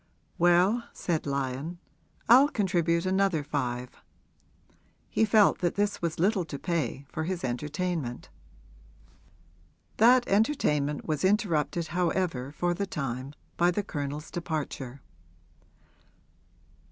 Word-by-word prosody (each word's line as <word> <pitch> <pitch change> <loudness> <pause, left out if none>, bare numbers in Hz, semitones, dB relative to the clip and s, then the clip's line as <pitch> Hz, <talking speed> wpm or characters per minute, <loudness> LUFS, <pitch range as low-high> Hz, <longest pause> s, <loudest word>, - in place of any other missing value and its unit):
'Well,' 175 +7 +4
said 165 -4 -2
Lyon, 140 +4 -3 0.5
'I'll 265 +5 +7
contribute 175 - +1
another 190 -4 +1
five.' 125 -4 -4 1.1
He 220 - +2
felt 210 -1 +4
that 175 -2 0
this 205 0 0
was 170 -2 -2
little 190 +2 +2
to 150 -3 -6
pay 145 -5 -2
for 160 +2 -4
his 180 0 -3
entertainment. 145 +1 -3 1.7
That 245 +2 +5
entertainment 150 - +1
was 155 0 -2
interrupted 175 -5 +1
however 170 -6 -1
for 175 +4 0
the 200 +3 -3
time 135 -3 -4 0.2
by 175 +1 +4
the 205 +4 -1
Colonel's 145 -1 -5
departure. 145 -6 -4
170 Hz, 105 wpm, -28 LUFS, 145-190 Hz, 1.7 s, I'll